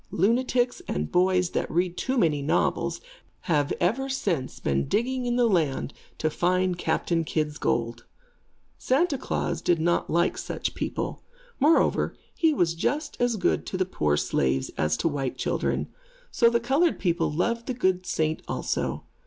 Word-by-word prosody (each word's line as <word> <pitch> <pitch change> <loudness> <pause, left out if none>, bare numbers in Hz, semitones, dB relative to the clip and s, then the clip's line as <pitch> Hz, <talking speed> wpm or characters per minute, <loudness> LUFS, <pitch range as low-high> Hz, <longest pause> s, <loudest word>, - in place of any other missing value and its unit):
Lunatics 245 +5 +1
and 75 +1 -2
boys 180 0 +2
that - - -1
read 175 +2 0
too 260 +6 -1
many 155 -9 +2
novels, 140 - 0 0.4
have 150 -6 +1
ever 240 +10 +1
since 175 - -2
been 70 0 0
digging 250 +3 0
in 240 - +1
the 245 -1 +3
land 160 -10 +1 0.2
to 155 - 0
find 180 +1 +1
Captain 165 +1 0
Kidd's 155 -1 -2
gold. 115 0 -1 0.7
Santa 285 +4 +2
Klaas 260 - -2
does 175 - +2
not 170 +2 +1
like 170 +2 +1
such - - -3
people. - - -4 0.4
Moreover, 305 +4 +3 0.2
he 325 -2 +3
was 175 - +1
just 290 - -2
as 245 -1 +2
good 205 - +1
to 185 - -3
the 185 - +1
poor 75 - 0
slaves, 65 -2 0
as 75 0 0
to - - 0
white 140 -4 -2
children. - - -1 0.4
So 235 - +4
the 235 0 +2
colored 275 +8 +2
people 170 -4 0
loved 230 +9 -1
the 255 - -2
good 185 -5 0
saint 155 -2 0
also. - - -2
180 Hz, 160 wpm, -26 LUFS, 155-240 Hz, 0.7 s, So